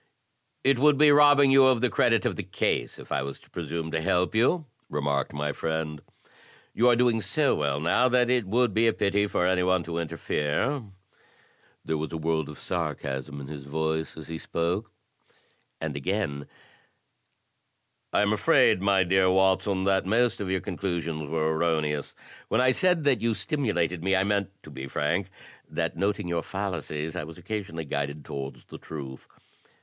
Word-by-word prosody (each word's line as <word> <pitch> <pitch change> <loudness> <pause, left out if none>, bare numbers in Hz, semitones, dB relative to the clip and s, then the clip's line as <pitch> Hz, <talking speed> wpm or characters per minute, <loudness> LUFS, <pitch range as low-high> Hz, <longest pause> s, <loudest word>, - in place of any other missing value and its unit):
"It 135 -2 +3
would 150 +1 +5
be 150 0 +6
robbing 145 -1 +6
you 135 0 +7
of 130 -3 +3
the 125 +1 +2
credit - - +2
of - - 0
the - - -3
case - - -2
if - - -13
I - - 0
was 70 0 -6
to - - -23
presume 80 -1 -4
to 80 - -1
help 90 +4 +1
you," 130 +9 +2 0.2
remarked 70 -1 -1
my 75 0 -2
friend. 80 -2 -3 0.7
"You 120 - +3
are 120 - +5
doing 120 -2 +2
so 135 +9 +1
well 70 -1 0
now 105 +11 +3
that 125 -1 +3
it 125 -5 +1
would 120 +1 +2
be 115 +3 +3
a 115 - +3
pity 100 0 +1
for 90 - 0
any 90 0 +2
one 90 -1 +2
to 85 0 -4
interfere." 85 - -1 1.0
There 80 -1 -1
was 80 - -4
a 80 - -3
world 80 -1 -1
of 75 - -9
sarcasm 70 +1 -4
in 70 - -8
his 70 -2 -8
voice, 80 +2 -2
as 80 - -9
he 80 -1 -5
spoke. 90 +7 -2 0.9
And - - -4
again: 70 -2 -2 0.8
" - - -47
I - - +3
am - - +2
afraid, 90 - +4
my 100 -1 +3
dear 95 +1 +3
Watson, 95 +1 +2
that 95 -1 +1
most 115 +2 +2
of 95 - -3
your 95 -1 0
conclusions 85 -5 -3
were 80 +1 0
erroneous. 80 -3 -1 0.3
When 110 - +1
I 130 0 +4
said 180 +2 +2
that 140 -3 +2
you 115 -1 +1
stimulated 90 - -1
me 95 +1 +2
I 95 - +3
meant, 100 -1 0
to 75 - -12
be 70 -1 -7
frank, 85 +8 -1 0.4
that - - -2
in - - -11
noting 100 0 0
your 85 -1 -1
fallacies 80 -6 -4
I - - -3
was 80 +1 -10
occasionally 90 -3 -5
guided 70 +1 -4
towards 70 -1 -7
the - - -11
truth. 70 -4 -8
90 Hz, 185 wpm, -27 LUFS, 80-110 Hz, 1.0 s, you